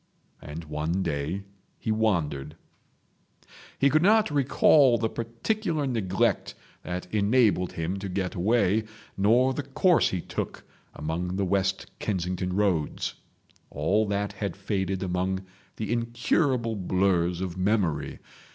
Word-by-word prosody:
And 75 +3 -7
one 80 +4 -2
day 80 +4 -2 0.3
he 110 - -2
wandered. 80 -10 0 1.2
He 140 0 +3
could 155 - +4
not 210 0 +4
recall 140 -2 +5
the 115 - 0
particular 155 - -2
neglect 105 -8 0 0.3
that 90 +1 -4
enabled 105 -3 +3
him 85 +4 -3
to 100 0 -5
get 95 0 -2
away, 105 +2 +2 0.3
nor 120 +7 +3
the 145 - -2
course 180 +4 +3
he 95 - -2
took - - -5 0.3
among 85 +4 -3
the 100 0 0
West 95 +1 0
Kensington 90 -2 -2
roads. 95 -7 0 0.6
All 105 +2 +1
that 100 0 -1
had 100 -2 -4
faded 95 -2 -2
among 95 +1 -1 0.3
the 110 +1 -2
incurable 120 +1 0
blurs 90 -2 +1
of 90 -2 -3
memory. 95 -6 0
100 Hz, 125 wpm, -27 LUFS, 90-115 Hz, 1.2 s, recall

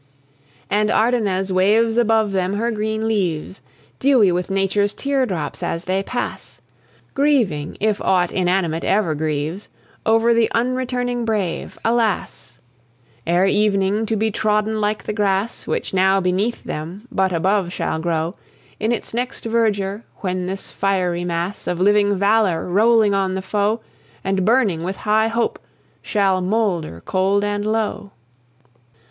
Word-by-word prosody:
And 210 +1 +1
Ardennes 210 -5 +1
waves 215 +5 +3
above 225 -3 +2
them 190 0 0
her 230 +3 0
green 220 0 -2
leaves, 185 -5 -2 0.4
Dewy 255 -8 +4
with 180 +2 -2
Nature's 195 +1 +1
tear 275 -2 0
drops, 165 -7 -4
as 165 - -2
they 190 +2 0
pass, 245 +5 -5 0.5
Grieving, 240 - +1
if 215 -1 0
aught 180 -2 +2
inanimate 180 -3 0
e'er 195 -5 +1
grieves, 155 +4 -3 0.3
Over 225 +1 +3
the 230 -1 +3
unreturning 245 0 -1
brave 210 -6 -2
alas! 220 - -1 0.7
Ere 175 +3 +3
evening 205 +1 +1
to 225 - 0
be 220 +1 0
trodden 215 +1 0
like 210 +1 -1
the 215 - -3
grass 205 +1 -1
Which, - - -2
now 190 +1 +3
beneath 190 +5 -1
them, 175 +9 -6
but 190 -4 +1
above 185 +2 +1
shall 160 - -2
grow 165 0 -1 0.5
In 220 +2 0
its 235 - -3
next 245 +1 -3
verdure, 215 -3 0 0.2
when 185 -2 -2
this 195 +1 -5
fiery 180 -3 0
mass 175 +3 -3
Of 175 - -1
living 205 +1 +3
valour, 200 -3 +2
rolling 215 +2 +4
on 190 -1 0
the 190 - -3
foe, 210 +3 0 0.4
And 195 -1 0
burning 215 -7 +2
with 185 +3 -3
high 215 +2 +1
hope, 230 +1 -1 0.4
shall 195 -3 +1
moulder 180 - -1
cold 195 +2 +1
and 205 0 -1
low. 215 -2 -2
200 Hz, 140 wpm, -20 LUFS, 185-220 Hz, 0.7 s, Dewy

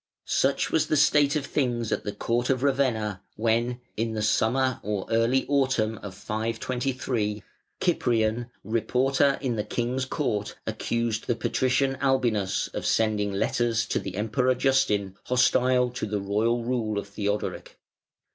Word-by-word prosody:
Such - - +1
was - - +2
the 155 - +2
state 145 0 +4
of 145 -2 -1
things 120 -6 -1
at - - -1
the 105 - -2
court 120 +3 -1
of 130 -1 +1
Ravenna 120 -8 +1
when, 120 +2 0
in 115 +1 -1
the 110 -1 -2
summer 130 +4 +2
or 105 -2 -3
early 115 +4 +2
autumn 130 -6 +1
of 100 -2 -8
523, 115 0 -2 0.4
Cyprian, 115 0 +1 0.2
Reporter 130 +6 +2
in 125 -4 -1
the 105 - 0
King's 125 +4 -2
Court, 105 -7 -2
accused 110 0 -2
the 120 - +1
Patrician 130 +4 +1
Albinus 120 -8 +1
of - - -5
sending 105 -2 +1
letters 115 +3 0
to - - -1
the 95 -2 -6
Emperor 125 +5 +1
Justin 105 -8 +1
hostile 125 0 +3
to 120 - -4
the 105 0 -1
royal 110 +4 0
rule 115 -3 -1
of 100 - -3
Theodoric. 105 0 -3
115 Hz, 145 wpm, -26 LUFS, 105-130 Hz, 0.4 s, state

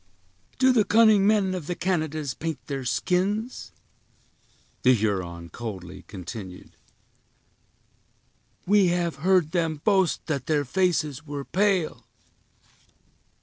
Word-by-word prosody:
"Do 260 0 +4
the 225 -4 +4
cunning 215 -1 +5
men 205 -3 +2
of 175 -5 -5
the 175 - -2
Canadas 155 -7 -2
paint 160 +1 -4
their 135 -2 -4
skins?" 185 - -1 1.1
the 130 0 +5
Huron 90 -6 -2
coldly 95 -3 -8
continued; 95 0 -9 1.9
"we 200 0 +4
have 175 -1 0
heard 175 0 +2
them 165 -4 -1
boast 190 -4 +2
that 140 -5 -3
their 150 -2 +1
faces 160 -2 0
were 145 -1 -5
pale." 190 -2 0
160 Hz, 105 wpm, -25 LUFS, 125-190 Hz, 1.9 s, cunning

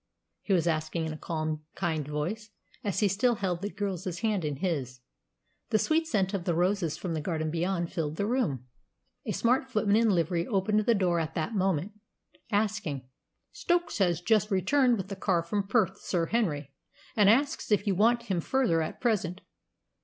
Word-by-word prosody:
he - - -4
was 175 -4 +3
asking 160 0 -1
in 160 - -3
a - - -7
calm, 155 -1 -3
kind 160 -5 -1
voice, 175 +10 -3 0.3
as 205 0 -1
he 210 - +5
still 235 +6 +2
held 180 -4 -2
the 205 - -2
girl's 195 -3 -4 0.2
hand 215 -5 0
in 150 -2 -2
his. 135 -6 -3 0.7
The 220 - +3
sweet 320 +7 +1
scent 195 - 0
of 185 -3 -2
the 175 - +1
roses 180 -2 +1
from 175 -3 -4
the 155 - -2
garden 155 -1 -2
beyond 170 +1 -1
filled 155 -2 -2
the 200 - -1
room. 210 - 0 0.6
A - - 0
smart 255 +3 +1
footman 215 -4 +2
in 225 0 +4
livery 170 -2 +1
opened 210 0 +1
the 225 +2 +3
door 180 -4 +2
at 160 -1 -3
that 160 +8 -2
moment, 190 -2 0 0.6
asking, 205 -11 -1 0.4
"Stokes 345 - 0
has 175 -3 +2
just 210 +2 +2
returned 240 +6 +3
with 195 -1 -5
the 195 - -4
car 185 -3 +1
from 195 +3 -2
Perth, 200 -3 +1
Sir 170 -3 0
Henry, 160 - -1 0.4
and 205 -2 +5
asks 270 +1 +2
if 205 0 +3
you 200 - +2
want 235 +5 +3
him 190 -7 -1
further 235 -8 +1
at 155 - -5
present." 200 -6 0
190 Hz, 185 wpm, -29 LUFS, 165-215 Hz, 0.7 s, he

